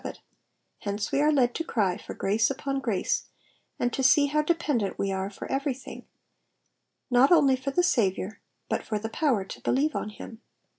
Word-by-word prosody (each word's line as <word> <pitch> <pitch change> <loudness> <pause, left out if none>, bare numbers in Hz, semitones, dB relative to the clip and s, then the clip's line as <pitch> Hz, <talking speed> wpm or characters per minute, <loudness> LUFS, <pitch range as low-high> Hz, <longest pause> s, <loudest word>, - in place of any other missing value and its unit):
of - - -4
it; - - -8 0.6
hence 205 0 -3
we 280 - +2
are 300 +1 +4
led 250 -5 +3
to 330 - -2
cry 200 - 0
for 210 - -9
grace 215 +4 +1
upon 275 0 -2
grace, 225 -8 -1 0.5
and 245 -1 -1
to - - -1
see 285 +2 +5
how 300 +2 +1
dependent 300 - 0
we 195 - -1
are 190 0 -2
for 200 - -8
everything, 270 -1 -4 1.0
not 250 +4 +5
only 285 -6 +6
for 260 +2 -4
the 355 +6 +2
8a^?iour, 210 - +1 0.3
but - - -1
for 215 - -3
the 220 +2 -4
power 240 -6 +1
to - - -9
believe 290 +4 +1
on - - -2
him. 220 +2 -10
250 Hz, 190 wpm, -27 LUFS, 210-280 Hz, 1.0 s, only